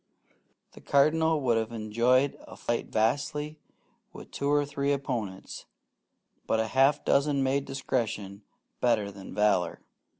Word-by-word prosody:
The -, -, -15 dB
Cardinal 160 Hz, +3 st, +3 dB
would 120 Hz, -4 st, +2 dB
have 110 Hz, 0 st, -3 dB
enjoyed 120 Hz, +5 st, +2 dB
a -, -, -11 dB
fight 120 Hz, 0 st, -2 dB
vastly 145 Hz, +7 st, -1 dB, 0.5 s
with -, -, -12 dB
two 140 Hz, -, -2 dB
or 145 Hz, 0 st, +3 dB
three 140 Hz, 0 st, -1 dB
opponents; 115 Hz, -9 st, -5 dB, 0.8 s
but 110 Hz, -, +1 dB
a 110 Hz, -, +1 dB
half 135 Hz, +3 st, +3 dB
dozen 140 Hz, 0 st, +2 dB
made 135 Hz, +1 st, 0 dB
discretion 110 Hz, -7 st, -3 dB, 0.4 s
better 110 Hz, -5 st, +1 dB
than 95 Hz, -1 st, -10 dB
valour. 100 Hz, -5 st, +2 dB
130 Hz, 130 wpm, -28 LUFS, 110-140 Hz, 0.8 s, Cardinal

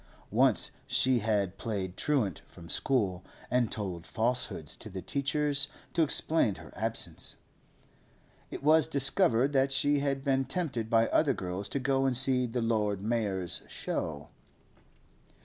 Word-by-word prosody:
Once -, -, +4 dB, 0.2 s
she 130 Hz, -1 st, +2 dB
had 100 Hz, -3 st, -1 dB
played 95 Hz, -5 st, -4 dB
truant 125 Hz, -, -1 dB
from 85 Hz, -, -13 dB
school, 100 Hz, -10 st, 0 dB, 0.3 s
and 125 Hz, -2 st, +1 dB
told 90 Hz, -6 st, -4 dB
falsehoods 115 Hz, -, -1 dB
to -, -, -10 dB
the 95 Hz, -, -6 dB
teachers 145 Hz, +3 st, -1 dB, 0.3 s
to 170 Hz, -, +2 dB
explain 155 Hz, -7 st, +2 dB
her -, -, -13 dB
absence. -, -, -4 dB, 1.1 s
It -, -, -8 dB
was 155 Hz, -2 st, +5 dB
discovered 135 Hz, -1 st, +4 dB
that 135 Hz, 0 st, +2 dB
she 145 Hz, +2 st, +2 dB
had 135 Hz, -1 st, -1 dB
been 135 Hz, -1 st, +1 dB
tempted 135 Hz, -7 st, -3 dB
by 115 Hz, 0 st, +4 dB
other 145 Hz, -4 st, +2 dB
girls 90 Hz, +2 st, -5 dB
to 140 Hz, -, -2 dB
go 135 Hz, 0 st, +1 dB
and 125 Hz, -2 st, +3 dB
see 130 Hz, -1 st, +4 dB
the 120 Hz, 0 st, -2 dB
Lord 105 Hz, -4 st, 0 dB
Mayor's 100 Hz, -6 st, -2 dB
show. 75 Hz, -3 st, -4 dB
125 Hz, 140 wpm, -30 LUFS, 100-140 Hz, 1.1 s, was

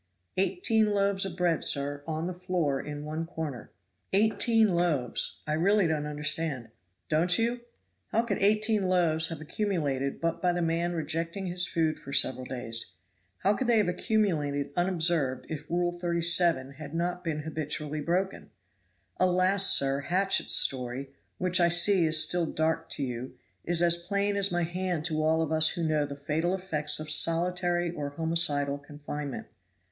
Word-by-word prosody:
"Eighteen 220 Hz, -, +1 dB
loaves 200 Hz, -1 st, +1 dB
of 180 Hz, -2 st, -6 dB
bread, 175 Hz, -3 st, +1 dB
sir, 145 Hz, 0 st, +1 dB
on 160 Hz, 0 st, -3 dB
the 180 Hz, -, -3 dB
floor 175 Hz, -6 st, -2 dB
in 150 Hz, 0 st, -7 dB
one 155 Hz, +2 st, -4 dB
corner." 155 Hz, -8 st, -6 dB, 0.4 s
"Eighteen 220 Hz, +2 st, +3 dB
loaves; 170 Hz, -9 st, 0 dB
I 150 Hz, -, -2 dB
really 195 Hz, +5 st, +2 dB
don't 155 Hz, -2 st, -1 dB
understand." 150 Hz, -4 st, -1 dB, 0.4 s
"Don't 170 Hz, +3 st, +2 dB
you? 235 Hz, +1 st, -1 dB, 0.5 s
how 230 Hz, -, 0 dB
could 215 Hz, -4 st, -2 dB
eighteen 215 Hz, +1 st, +2 dB
loaves 165 Hz, -3 st, +2 dB
have 165 Hz, -3 st, -6 dB
accumulated 150 Hz, -6 st, -2 dB
but 165 Hz, 0 st, -2 dB
by 180 Hz, -1 st, +2 dB
the 175 Hz, -, -2 dB
man 170 Hz, +1 st, -1 dB
rejecting 165 Hz, +4 st, -2 dB
his 180 Hz, 0 st, -1 dB
food 160 Hz, -3 st, -1 dB
for 140 Hz, -, -10 dB
several 130 Hz, -2 st, +2 dB
days? 115 Hz, -7 st, 0 dB, 0.5 s
How 200 Hz, -, +4 dB
could 255 Hz, +4 st, -2 dB
they 235 Hz, -1 st, +4 dB
have 210 Hz, -4 st, +2 dB
accumulated 165 Hz, -, -1 dB
unobserved 170 Hz, -7 st, +1 dB
if 150 Hz, -1 st, -7 dB
Rule 175 Hz, 0 st, 0 dB
37 170 Hz, -5 st, +2 dB
had 155 Hz, 0 st, -8 dB
not 175 Hz, +1 st, -2 dB
been 155 Hz, -3 st, -3 dB
habitually 150 Hz, -1 st, -4 dB
broken? 180 Hz, +5 st, -2 dB, 0.7 s
Alas! 185 Hz, +2 st, +3 dB
sir, 135 Hz, 0 st, +2 dB
Hatchett's 185 Hz, +7 st, +2 dB
story, 130 Hz, +1 st, 0 dB, 0.3 s
which 185 Hz, +1 st, +1 dB
I 170 Hz, -1 st, +4 dB
see 175 Hz, 0 st, +5 dB
is 155 Hz, 0 st, +4 dB
still 175 Hz, -2 st, -1 dB
dark 160 Hz, +1 st, -1 dB
to 140 Hz, -, -3 dB
you, 125 Hz, 0 st, -5 dB, 0.3 s
is 175 Hz, 0 st, +2 dB
as 170 Hz, 0 st, +3 dB
plain 200 Hz, +3 st, -1 dB
as 200 Hz, -1 st, +3 dB
my 175 Hz, 0 st, 0 dB
hand 175 Hz, -1 st, -3 dB
to 155 Hz, -2 st, 0 dB
all 160 Hz, +1 st, +2 dB
of 160 Hz, -, -4 dB
us 155 Hz, 0 st, +4 dB
who 170 Hz, -, -3 dB
know 155 Hz, -2 st, 0 dB
the 140 Hz, -, -7 dB
fatal 155 Hz, +5 st, -1 dB
effects 155 Hz, -7 st, 0 dB
of 155 Hz, 0 st, -2 dB
solitary 175 Hz, +2 st, +1 dB
or 145 Hz, -4 st, -5 dB
homicidal 145 Hz, -2 st, +1 dB
confinement. 145 Hz, -1 st, -7 dB
165 Hz, 160 wpm, -28 LUFS, 150-180 Hz, 0.7 s, see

